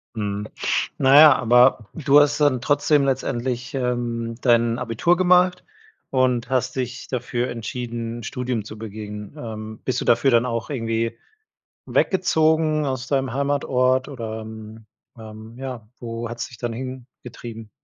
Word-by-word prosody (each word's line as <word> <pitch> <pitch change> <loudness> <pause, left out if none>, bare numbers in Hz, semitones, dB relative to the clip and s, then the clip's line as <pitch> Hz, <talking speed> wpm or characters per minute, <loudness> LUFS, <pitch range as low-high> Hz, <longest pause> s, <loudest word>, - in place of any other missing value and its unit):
Mhm. 105 -1 -3 0.5
Na 135 +1 +4
ja, 155 -1 +9
aber 120 -2 +4
du 145 -1 +4
hast 145 0 +3
dann 130 -5 +3
trotzdem 145 0 +2
letztendlich, 125 -2 -2
ähm, 120 -2 -2
dein 115 -1 +3
Abitur 125 +9 +1
gemacht 180 0 +3 0.5
und 130 -2 +1
hast 130 -1 0
dich 125 -1 -4
dafür 125 -1 -2
entschieden, 120 0 -5
Studium 125 -2 -3
zu 110 +1 -10
begehen. 105 +1 -8
Ähm, 110 -3 -7
bist 130 - 0
du - - -4
dafür 120 +3 +3
dann 120 +1 +4
auch 115 -2 -3
irgendwie 115 -3 -2 0.7
weggezogen 160 -4 +2
aus 130 -2 -3
deinem 135 -3 0
Heimatort, 130 -2 +1
oder, 110 -4 -6
ähm, 110 0 -10 0.3
ähm, 110 +1 -11
ja, 125 -5 -7
wo 115 0 -5
hat's 120 +1 -5
dich 120 - -14
dann 120 -2 -3
hingetrieben? 120 -3 -9
120 Hz, 140 wpm, -22 LUFS, 115-135 Hz, 0.7 s, ja